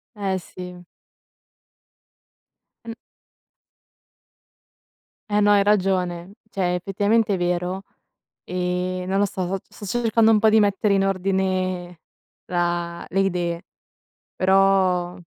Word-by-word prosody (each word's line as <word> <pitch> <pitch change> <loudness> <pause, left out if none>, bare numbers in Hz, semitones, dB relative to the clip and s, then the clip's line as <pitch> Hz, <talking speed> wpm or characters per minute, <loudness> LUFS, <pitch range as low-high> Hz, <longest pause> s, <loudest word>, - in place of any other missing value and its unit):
Eh, 195 -2 -1
sì. 180 0 -10 2.0
Mh. 230 - -6 2.3
Eh, 205 0 +2
no, 205 - +4
hai 200 -1 +4
ragione. 185 -3 0 0.2
Cioè, 180 -2 0
effettivamente, 205 +4 +1
è - - 0
vero, 180 +2 -1 0.6
ehm, 180 0 -2
non 195 +1 0
lo 205 - +3
so, 185 -2 -4 0.2
so 205 - -11
sto 240 +5 -1
cercando 225 -1 +4
un 215 - +4
po' 220 +1 +4
di 220 0 +5
mettere 200 0 +2
in 195 0 +2
ordine 185 -2 -1 0.5
la 175 -1 -2
le 195 - -1
idee. 175 -3 -1 0.7
Però 185 -2 +2
185 Hz, 110 wpm, -23 LUFS, 180-200 Hz, 2.3 s, di